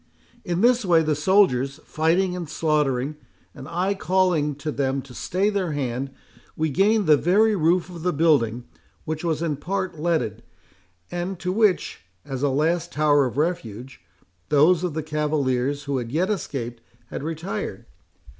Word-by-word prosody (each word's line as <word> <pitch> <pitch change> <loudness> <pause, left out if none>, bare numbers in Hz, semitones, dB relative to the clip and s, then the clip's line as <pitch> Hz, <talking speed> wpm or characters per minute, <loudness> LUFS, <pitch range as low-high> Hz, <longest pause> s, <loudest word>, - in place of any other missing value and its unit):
In 175 +1 -1
this 245 +1 +4
way, 170 -4 +4
the 155 -1 +1
soldiers 150 -5 +2
fighting 175 +4 +1
and 175 -4 -5
slaughtering, 150 -3 0 0.4
and 135 -2 -10
I 180 +4 0
calling 180 -6 +1
to 150 +2 -4
them 135 -1 -1
to 135 - -13
stay 190 - 0
their 190 -6 -1
hand, 135 -1 -2 0.5
we 155 -1 0
gained 205 +7 +3
the 155 -2 +6
very 210 +7 +3
roof 170 0 +2
of 175 -3 -9
the 180 +2 +1
building, 140 -8 +2 0.4
which 155 +1 -4
was 165 -1 -1
in 155 -4 -1
part 185 +1 -3
leaded, 155 - -1 0.7
and 175 +2 -3
to 180 +1 -3
which, 210 -1 +1 0.2
as 135 -1 -5
a 145 - +2
last 160 +5 0
tower 145 -2 +3
of 125 - -7
refuge, 125 - -3 0.5
those 160 +4 +4
of 175 -4 -2
the 160 - -2
cavaliers, 145 -3 -1
who 140 -2 -1
yet 155 - -1
escaped, 120 - -4 0.3
had - - -4
retired. 165 +5 -4
155 Hz, 155 wpm, -24 LUFS, 140-180 Hz, 0.7 s, the